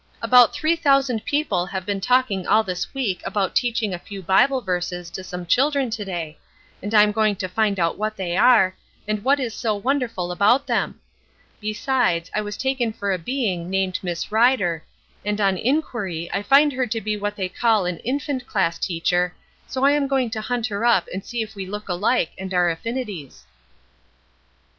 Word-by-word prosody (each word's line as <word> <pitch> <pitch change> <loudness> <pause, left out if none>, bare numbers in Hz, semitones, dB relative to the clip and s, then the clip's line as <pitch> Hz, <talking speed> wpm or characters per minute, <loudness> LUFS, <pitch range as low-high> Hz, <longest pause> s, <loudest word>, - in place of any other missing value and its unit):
"About 250 -2 +6
three 315 +2 +1
thousand 275 -7 +2
people 285 - 0
have 190 -2 -5
been 200 -1 -2
talking 245 -5 +1
all 215 +2 +4
this 180 -3 -4
week 240 -9 -2
about 195 -3 -1
teaching 230 -4 0
a 175 - -4
few 195 0 -9
Bible 260 +10 +3
verses 180 -4 -3
to 190 - -6
some 180 -1 -6
children 270 - +2
to 220 -2 -3
day, 170 -5 -5 0.4
and 205 - -5
I 210 - +8
am 210 - +2
going 215 -1 +1
to 185 -1 -4
find 200 +1 0
out 170 +2 0
what 215 0 -2
they 175 -3 -2
are, 195 -4 +5 0.3
and 215 -1 -2
what 280 +2 +3
is 240 -4 -3
so 220 -2 -1
wonderful 230 -6 -1
about 210 +9 +3
them. - - -1 0.6
Besides, 215 -5 0
I 210 - 0
was 205 -1 -6
taken 265 -4 0
for 200 -2 -3
a 185 - -1
being 185 -5 -2
named 190 -1 0
Miss 175 +1 -4
Rider, 215 -8 +2 0.4
and 210 0 -2
on 195 -2 +2
inquiry 205 - -2
I 195 - 0
find 280 +6 +5
her 255 0 -1
to 225 0 -2
be 215 0 -2
what 205 0 -3
they 190 -2 -2
call 215 +1 +1
an 180 -2 -3
infant 260 +1 -3
class 170 -4 0
teacher, 175 0 0 0.3
so 260 +1 -1
I 280 - +6
am 290 -1 +1
going 265 -4 0
to 220 -1 -3
hunt 240 +1 -2
her 205 -2 -3
up 235 -7 +3
and 190 +1 -4
see 235 -1 -3
if 215 - -11
we 195 -2 -6
look 210 +2 -6
alike 195 +1 +1
and 190 0 -6
are 175 -1 +3
affinities." 175 - -6
210 Hz, 195 wpm, -22 LUFS, 185-245 Hz, 0.6 s, I